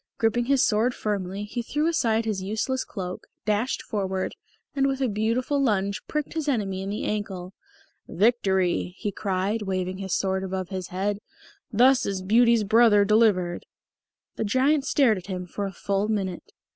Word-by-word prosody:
Griping 235 +1 +1
his 275 0 +3
sword 230 +4 +1
firmly, 200 -1 -3
he 220 +4 -4
threw 295 +6 -1
aside 230 -9 +1
his 210 -4 -2
useless 220 +7 -1
cloak, 185 -3 -6 0.2
dashed 215 +4 0
forward, 190 -3 -2 0.4
and 275 -1 +2
with 270 -1 -1
a 265 - +1
beautiful 235 +6 0
lunge 200 -6 0
pricked 300 -1 -3
his 315 -2 -3
enemy 200 -8 -1
in 195 - -4
the 210 - -3
ankle. 195 -3 -3 0.5
"Victory!" 190 -4 +1
he 205 - -3
cried, 195 +3 -1
waving 185 -2 -2
his 195 - -4
magic 190 - -3
sword 190 -1 -1
above 190 -1 -4
his 185 -2 -4
head. 200 +2 -2 0.5
"Thus 250 +3 +4
is 195 -2 -3
Beauty's 230 +2 +4
brother 215 -1 +5
delivered!" 200 -5 +2 0.7
The - - -1
Giant 270 +6 +2
stared 235 -9 +3
at 180 - -14
him 180 -2 -4
for 200 +3 -4
a - - -6
full 195 +2 -1
minute. 195 -5 -3
210 Hz, 170 wpm, -25 LUFS, 190-235 Hz, 0.7 s, brother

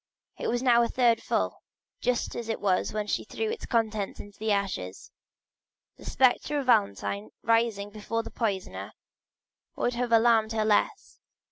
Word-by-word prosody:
It - - -2
was 245 +2 0
now 240 -2 +5
a 235 - +2
third 240 -2 +2
full, - - -1 0.4
just 250 -2 -1
as 235 -1 -5
it 225 - -1
was 190 -2 +1
when 210 -1 -2
she - - -1
threw 445 0 -3
the - - -10
contents 220 -4 -1
into 205 0 -11
the 220 0 0
ashes. 195 - -2 0.9
The - - -14
spectre 265 +3 +2
of 280 - -2
Valentine 100 - +1
rising 225 -3 +1
before 225 +2 -3
the - - -9
poisoner 200 -5 -3 0.8
would 245 - 0
have 240 0 -2
alarmed 225 -1 +4
her 220 -1 +1
less. 220 - 0
225 Hz, 160 wpm, -28 LUFS, 205-240 Hz, 0.9 s, now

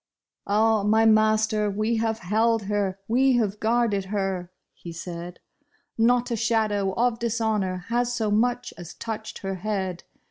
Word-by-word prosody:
" - - -66
Ah, 215 +1 +3
my 220 +2 +3
master, 215 -1 +3
we 215 +3 0
have 225 0 0
held 220 +3 +1
her, 200 -1 -1
we 260 +3 +3
have 210 -4 0
guarded 220 -3 +1
her," 190 -3 -3 0.2
he 170 - -10
said; 170 +1 -7 0.3
" - - -42 0.2
Not 240 +2 +2
a - - +1
shadow 215 -3 0
of 235 +1 +1
dishonor 215 -6 -1
has 240 +1 +1
so 225 -3 -1
much 245 +3 0
as 175 -1 -9
touched 220 -2 -6
her 195 0 -2
head. 190 -4 -3
215 Hz, 155 wpm, -25 LUFS, 195-230 Hz, 0.3 s, Ah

